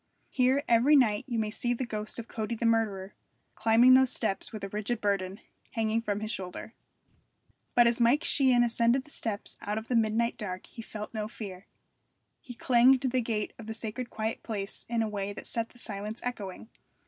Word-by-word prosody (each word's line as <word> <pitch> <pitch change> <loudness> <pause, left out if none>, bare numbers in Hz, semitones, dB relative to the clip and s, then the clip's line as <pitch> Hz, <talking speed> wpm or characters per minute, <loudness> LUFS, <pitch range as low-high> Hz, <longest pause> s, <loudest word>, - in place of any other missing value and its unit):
Here 260 +2 +2
every 240 +6 +5
night 220 -7 +3
you 240 -3 -2
may 215 -1 -1
see 240 +2 -1
the 255 - -3
ghost 215 -2 -5
of 235 -1 -6
Cody 220 +1 -3
the 230 - -3
murderer, 210 -4 +1 0.4
climbing 230 +3 +5
those 260 -1 +5
steps 210 -4 0
with 215 -2 -7
a 195 - -3
rigid 215 +3 -2
burden 195 -2 -1 0.3
hanging 225 0 0
from 205 -2 -2
his 215 0 -3
shoulder. 190 +3 -6 1.0
But 240 - +7
as 235 0 +2
Mike 245 +6 +4
Sheehan 255 -4 +4
ascended 235 +2 +2
the 295 - -16
steps 215 -7 -4
out 210 +1 -2
of 220 +1 -6
the 250 - +1
midnight 230 +1 +1
dark 185 -3 -4
he 230 - -10
felt 215 -1 -8
no 215 -1 -3
fear. 200 -4 -9 0.7
He 245 - -10
clanged 250 +2 +5
the 255 -1 +1
gate 220 -3 -2
of 220 - -9
the 220 - -4
sacred 235 +2 -5
quiet 220 0 -3
place 205 -3 -5
in 230 -1 +1
a - - -1
way 205 -1 -3
that - - -8
set 230 -1 -1
the - - -20
silence 210 0 -4
echoing. 220 -3 -5
225 Hz, 195 wpm, -29 LUFS, 210-240 Hz, 1.0 s, But